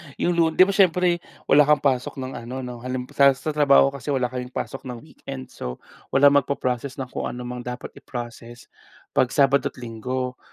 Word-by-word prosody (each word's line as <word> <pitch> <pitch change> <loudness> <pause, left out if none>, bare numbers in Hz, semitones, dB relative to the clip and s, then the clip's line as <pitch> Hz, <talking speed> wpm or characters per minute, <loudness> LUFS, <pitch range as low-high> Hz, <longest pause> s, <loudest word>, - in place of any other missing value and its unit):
yung 175 - 0
lu 170 - +4
'di 185 - +6
ba 200 - +1
siyempre 180 -2 +3 0.3
wala 145 0 +7
kang 150 -1 +3
pasok 130 -3 0
ng 130 -1 -5 0.2
ano 130 +1 -5
'no, 125 -1 -7
hal 125 +1 -4 0.2
sa 140 +2 +3
trabaho 140 -2 +5
kasi 140 0 -10
wala 130 -4 0
kayong 125 0 -5
pasok 135 0 -5
ng 125 -1 -6
weekend, 65 -1 -9
so, 60 0 -6 0.4
walang 140 +1 +6
magpo-process 130 -1 -3
ng 130 -2 -6
kung - - -3
ano 125 0 -6
mga 125 0 -5
dapat - - -10
i-proccess, 120 -1 -9 0.4
pag 125 - +3
Sabado 140 0 +4
at 140 - -8
Linggo. 125 +2 -4
130 Hz, 190 wpm, -23 LUFS, 125-140 Hz, 0.4 s, wala